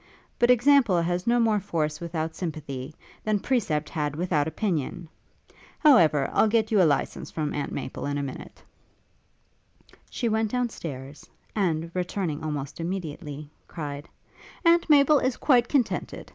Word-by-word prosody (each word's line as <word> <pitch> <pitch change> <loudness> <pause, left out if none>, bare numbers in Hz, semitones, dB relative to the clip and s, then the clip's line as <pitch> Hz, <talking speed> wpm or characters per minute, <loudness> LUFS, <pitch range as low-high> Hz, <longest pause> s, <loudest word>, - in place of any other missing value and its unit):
But 240 - +4
example 250 -6 +5
has 175 +3 -1
no 240 +1 +3
more 220 -3 +3
force 155 -6 -2
without 165 -1 -3
sympathy, 150 -4 -6 0.3
than 215 -1 +1
precept 185 - 0
had 150 -3 -3
without 160 -3 0
opinion! 170 -1 -2 0.7
However, 165 - +5
I'll - - +4
get 220 0 +1
you 210 -3 +4
a 165 - +5
licence 140 - -2
from 155 -2 -3
Aunt 145 - -3
Maple 135 0 -5
in 145 0 -2
a 140 - -2
minute.' 135 -2 -8 1.5
She 240 - -2
went 220 0 +1
down 250 +1 0
stairs, 140 - -8 0.3
and, 165 -5 0
returning 180 -4 -3
almost 145 -2 -4
immediately, 160 -4 -5 0.2
cried, 145 -2 -6 0.6
'Aunt 335 0 +4
Maple 290 0 +6
is 255 -1 -1
quite 245 -4 +3
contented. 260 -6 -1
170 Hz, 145 wpm, -26 LUFS, 150-225 Hz, 1.5 s, Maple